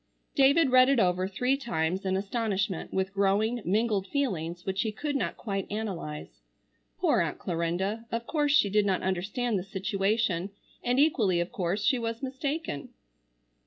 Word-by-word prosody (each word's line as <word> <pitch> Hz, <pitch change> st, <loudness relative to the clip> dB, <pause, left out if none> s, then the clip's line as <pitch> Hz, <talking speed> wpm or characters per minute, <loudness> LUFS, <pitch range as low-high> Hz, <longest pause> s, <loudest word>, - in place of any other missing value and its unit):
David 280 Hz, 0 st, +4 dB
read 255 Hz, +1 st, +7 dB
it 275 Hz, -3 st, +3 dB
over 185 Hz, -1 st, +2 dB
three 250 Hz, +7 st, +1 dB
times 190 Hz, -, -2 dB
in 190 Hz, 0 st, +1 dB
astonishment 200 Hz, -3 st, -2 dB
with 190 Hz, +1 st, -1 dB
growing, 205 Hz, +4 st, +1 dB
mingled 205 Hz, 0 st, +1 dB
feelings 175 Hz, -, -2 dB
which 190 Hz, +1 st, -1 dB
he 220 Hz, -, -1 dB
could 290 Hz, +7 st, -3 dB
not 275 Hz, -, -1 dB
quite 195 Hz, -4 st, -3 dB
analyze. 170 Hz, -, -5 dB, 0.6 s
Poor -, -, +3 dB
Aunt -, -, -2 dB
Clarinda! 185 Hz, +6 st, -2 dB
Of 230 Hz, 0 st, -2 dB
course 295 Hz, 0 st, +1 dB
she 215 Hz, -9 st, +4 dB
did 210 Hz, 0 st, +3 dB
not 190 Hz, -2 st, 0 dB
understand 195 Hz, +5 st, -1 dB
the -, -, -5 dB
situation, 195 Hz, -1 st, 0 dB, 0.3 s
and 245 Hz, +2 st, +1 dB
equally 220 Hz, -, +3 dB
of 175 Hz, +1 st, -2 dB
course 195 Hz, -1 st, -1 dB
she 260 Hz, -4 st, +3 dB
was 230 Hz, +2 st, -4 dB
mistaken. 275 Hz, -, -3 dB
205 Hz, 160 wpm, -28 LUFS, 190-245 Hz, 0.6 s, read